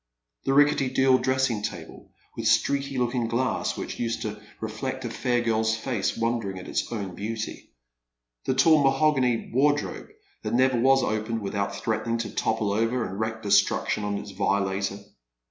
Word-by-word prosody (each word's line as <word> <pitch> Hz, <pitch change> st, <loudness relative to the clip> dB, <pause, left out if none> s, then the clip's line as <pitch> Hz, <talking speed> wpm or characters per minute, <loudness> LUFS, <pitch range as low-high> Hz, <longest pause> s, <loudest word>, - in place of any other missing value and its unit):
The 135 Hz, -, +2 dB
rickety 145 Hz, -2 st, +4 dB
deal 130 Hz, 0 st, +4 dB
dressing 130 Hz, -4 st, +1 dB
table, -, -, -7 dB, 0.3 s
the 115 Hz, -, -4 dB
streaky 135 Hz, +5 st, +2 dB
looking 120 Hz, -1 st, 0 dB
■ -, -, -7 dB
glass, 120 Hz, +2 st, -1 dB
which -, -, -5 dB
used 115 Hz, -1 st, -2 dB
to 105 Hz, -1 st, -5 dB, 0.2 s
reflect 115 Hz, +4 st, -4 dB
a 115 Hz, -, -3 dB
fair 120 Hz, 0 st, 0 dB
girl's 110 Hz, -1 st, +1 dB
face 110 Hz, -2 st, -2 dB
wondering 115 Hz, -5 st, -1 dB
at 90 Hz, -, -8 dB
its -, -, -2 dB
own 100 Hz, -5 st, -4 dB
beauty. 110 Hz, +3 st, -5 dB, 0.8 s
The 130 Hz, -, +1 dB
tall 155 Hz, +2 st, +5 dB
mahogany 135 Hz, -3 st, +2 dB
wardrobe 145 Hz, +3 st, +1 dB, 0.3 s
that -, -, -2 dB
never 130 Hz, -1 st, +3 dB
was 135 Hz, +2 st, +4 dB
opened 110 Hz, +1 st, -1 dB
without 100 Hz, 0 st, -2 dB
threatening 110 Hz, +2 st, -1 dB
to 115 Hz, -, -4 dB
topple 110 Hz, -2 st, 0 dB
over 115 Hz, +3 st, 0 dB
and 95 Hz, +2 st, -6 dB
wreak 110 Hz, 0 st, -3 dB
destruction 105 Hz, +1 st, +2 dB
on 105 Hz, 0 st, -1 dB
its 100 Hz, -, -7 dB
violator. 100 Hz, 0 st, 0 dB
115 Hz, 165 wpm, -26 LUFS, 105-130 Hz, 0.8 s, tall